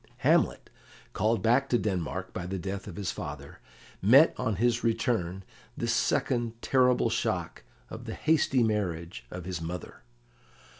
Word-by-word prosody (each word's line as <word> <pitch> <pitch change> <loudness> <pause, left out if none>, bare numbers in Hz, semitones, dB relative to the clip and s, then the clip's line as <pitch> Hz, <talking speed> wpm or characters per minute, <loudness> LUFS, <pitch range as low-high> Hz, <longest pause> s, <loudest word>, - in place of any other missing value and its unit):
Hamlet, - - +2 0.4
called 110 0 +1
back 130 +4 +3
to 120 - +3
Denmark 95 -6 -3
by 90 -1 -4
the 95 +1 -3
death 95 +2 -5
of 95 - -7
his 100 0 -2
father, 70 -3 -7 0.4
met 135 - +7
on 120 -5 -1
his 120 +4 +1
return 105 -5 0 0.3
this 115 0 0
second 120 0 0
terrible 125 -1 +3
shock - - -2 0.2
of - - -9
the - - -5
hasty 150 -5 +2
marriage 85 - -2
of 90 -1 -7
his 90 -3 -4
mother. 85 +2 -6
105 Hz, 145 wpm, -28 LUFS, 90-120 Hz, 0.4 s, met